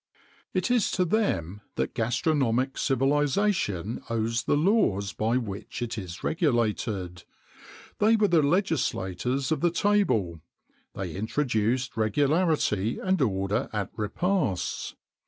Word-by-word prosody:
It - - 0
is 240 -5 +3
to 180 - +3
them 105 - 0
that - - -2
gastronomic 130 +1 +1
civilization 135 - +1
owes 115 0 -1
the - - +2
laws 145 - +2
by 115 +3 +1
which 105 -5 -5
it 120 - -4
is 90 -5 -7
regulated; 110 - -1 0.8
they 220 +2 +5
were 215 -2 +3
the 170 -4 +4
legislators 135 - 0
of 160 - 0
the 175 - +4
table: 165 - +1 0.5
they 90 -4 -4
introduced 115 +2 -1
regularity 135 - +1
and 185 -3 0
order 105 +1 0
at 105 -3 -3
repasts. 110 - -1
120 Hz, 115 wpm, -27 LUFS, 105-160 Hz, 0.8 s, they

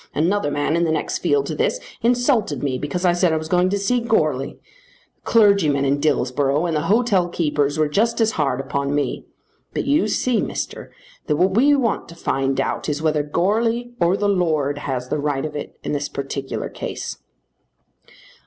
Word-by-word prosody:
Another 170 +1 +1
man 145 +2 0
in 170 - +2
the 165 - +1
next 160 - -1
field 425 -1 +1
to - - -4
this - - 0 0.2
insulted 240 - +1
me 130 -3 -1
because 175 +6 -3
I 175 - +4
said 175 -1 +2
I 160 - +1
was 155 0 -5
going 180 +2 +2
to 200 - 0
see 220 +5 +1
Goarly. 155 - 0
The - - -30
clergyman 200 -11 +4
in 140 +1 +1
Dillsborough 140 +1 +1
and 165 -2 -1
the 150 - -1
hotelkeepers 175 - +1
were 155 -1 +2
just 225 +10 +1
as 225 -1 +3
hard 135 -7 0
upon 140 +1 -2
me. 145 - -2 0.5
But - - -1
you 280 -5 +2
see, 240 +2 +1
Mister, - - -5 0.4
that 150 - +2
what 185 +5 +2
we 285 +5 +5
want 245 -5 -1
to 170 - -11
find 135 -4 -1
out 135 - -1
is 150 +1 -2
whether 155 -1 +2
Goarly 225 +10 0
or 175 +3 +3
the 205 - 0
Lord 155 -7 +1
has 125 -3 -4
the 150 - -1
right 145 -1 -1
of 150 -1 -6
it 145 - -6
in - - -3
this 145 -1 -2
particular 140 0 -4
case." - - -6
160 Hz, 190 wpm, -21 LUFS, 145-210 Hz, 0.5 s, we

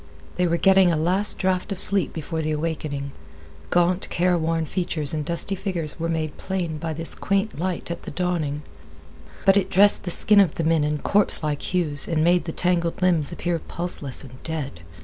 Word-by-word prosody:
They 180 0 +2
were 170 0 +1
getting 190 -1 +5
a 165 - 0
last 185 +6 +1
draught 185 +2 -1
of 195 - -3
sleep 200 0 +4
before 160 +1 -4
the 155 - -2
awakening. 150 -3 -3 0.6
The - - -3
gaunt, 175 +1 +2
careworn 165 -2 0
features 155 -4 -1
and 155 -1 -2
dusty 170 +5 +1
figures 175 -5 -3
were 165 +1 -2
made 160 -2 -3
plain 175 -5 -3
by 160 0 -4
this 165 +2 -2
quaint 195 -3 -1
light 180 -1 -3
at 170 - -5
the - - -8
dawning, 160 -5 -2 0.8
but 195 0 +5
it 190 -1 0
dressed 200 +2 +5
the 180 - -4
skin 205 +4 +4
of 190 -6 +3
the 165 - -2
men 160 -1 +2
in 150 0 -1
corpse 200 +2 +1
like 150 -2 -2
hues 155 -6 0
and 160 -2 0
made 175 +1 +3
the 165 - -4
tangled 170 -1 -1
limbs 170 -5 +2
appear 170 -1 -2
pulseless 160 -6 -2
and 130 -1 -13
dead. 150 - -5
170 Hz, 195 wpm, -23 LUFS, 155-185 Hz, 0.8 s, getting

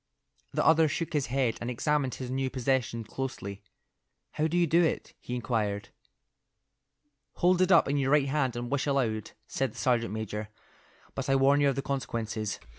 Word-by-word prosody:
The - - 0
other 160 0 +6
shook 165 +3 -3
his 145 -3 0
head 125 -2 0
and 120 - -3
examined 135 +2 0
his 130 -1 -6
new 135 0 -1
possession 130 -3 -1
closely. 105 -4 -5 0.7
"How 155 - 0
do 170 +2 -1
you 175 - +4
do 170 +2 +4
it?" 160 - -1
he 125 - -5
inquired. 105 -4 -2 1.4
"Hold 180 +1 +3
it 185 +1 +3
up 170 - +6
in 140 +1 +1
your 135 -1 +1
right 145 -1 +4
hand 135 -4 0
and 120 0 -4
wish 140 +1 0
aloud," 115 -7 0
said 135 -1 -2
the - - -14
sergeant 120 -4 +1
major, 105 -1 -4 0.6
"but 135 0 -4
I 135 - +4
warn 140 +2 +4
you 140 - +4
of 135 - -1
the 140 - -2
consequences." 110 -6 -3
135 Hz, 185 wpm, -29 LUFS, 115-145 Hz, 1.4 s, other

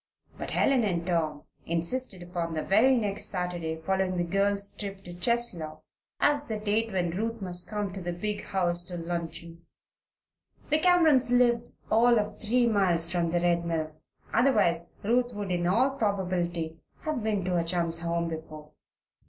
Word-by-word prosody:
But - - -5
Helen 265 -3 +2
and 175 -5 -1
Tom 160 -4 -1 0.2
insisted 180 +4 -1
upon 170 -2 -4
the 155 - -1
very 245 +7 +4
next 210 -3 +1
Saturday 175 -3 -2
following 190 +2 0
the 175 - +1
girls' 200 +3 +1
trip 195 -1 -6
to 175 - -9
Cheslow 175 -7 -1 0.4
as 290 0 +3
the 220 -4 -3
date 215 +2 0
when 180 -3 0
Ruth 225 +3 -2
must 180 -2 0
come 205 -3 -3
to 190 - -6
the 175 0 -3
big 205 +4 -3
house 175 -2 0
to 180 - -5
luncheon. 170 0 -5 1.1
The 305 - +4
Camerons 320 -7 +5
lived 245 -1 +2 0.2
all 235 +2 +5
of 210 0 -2
three 240 +2 +3
miles 180 -7 +2
from 170 -2 +1
the 175 +1 0
Red 170 -1 +2
Mill; 160 -2 -2 0.4
otherwise 210 -9 +3 0.2
Ruth 240 +3 +1
would 205 -2 -4
in 175 -1 0
all 240 +9 +3
probability 180 -8 -2 0.2
have 305 -5 -2
been 210 -4 -1
to 185 - -1
her 175 -2 +1
chum's 170 -1 0
home 170 0 -1
before. 155 -2 -8
185 Hz, 165 wpm, -28 LUFS, 170-220 Hz, 1.1 s, Camerons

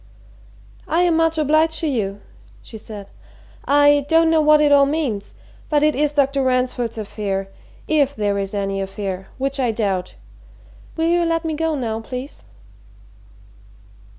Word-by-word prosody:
"I 335 - +1
am 350 -2 +3
much 325 0 +2
obliged 310 +2 +2
to 325 - 0
you," 205 -7 -2 0.4
she 220 - -10
said. 205 -2 -9 0.6
"I 290 0 +4
don't 325 0 +4
know 320 -1 +4
what 305 0 +5
it 295 -1 +3
all 280 -1 +6
means 275 -10 -3 0.3
but 295 -1 +2
it 305 0 +3
is 295 +2 0
Dr. 275 -1 +2
Ransford's 250 -3 0
affair 200 -2 -4 0.4
if 285 -3 +2
there 205 -2 -1
is 195 +1 -4
any 195 -1 -2
affair, 195 -1 -5
which 275 +1 -2
I 250 -3 +1
doubt. 195 -5 -2 0.8
Will 325 0 +1
you 345 +1 +2
let 330 0 -1
me 320 - -1
go 320 0 -1
now, 225 -5 -3
please?" 250 +4 -8
275 Hz, 150 wpm, -20 LUFS, 210-310 Hz, 0.8 s, all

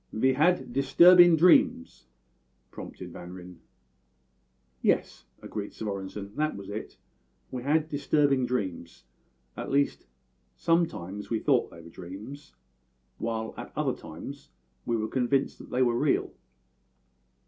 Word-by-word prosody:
"Ve 130 +4 +2
had 155 -2 +1
disturbin' 175 +6 +7
dreams," 250 - +3 0.6
prompted - - -9
Van 90 0 -9
Ryn. 90 -1 -11 1.2
"Yes," 60 - 0 0.2
agreed 105 -1 -6
Svorenssen, 100 -1 -6
"that 155 0 0
was 100 0 -8
it; 105 - -7 0.5
we 125 - -4
had 150 +4 +1
disturbing 145 -3 +1
dreams 95 -8 -4 0.5
at - - -6
least 140 - 0 0.5
sometimes 105 - -1
we 115 - 0
thought 130 +1 +2
they 85 - -13
were 85 - -12
dreams, 100 - -10 0.6
while 110 -1 -3
at - - -8
other - - 0
times 135 - -10 0.4
we 115 - +1
were 110 0 -2
convinced 130 +3 0
that - - -12
they 130 +1 +2
were 120 -2 +2
real. - - +1
125 Hz, 125 wpm, -28 LUFS, 100-150 Hz, 1.2 s, disturbin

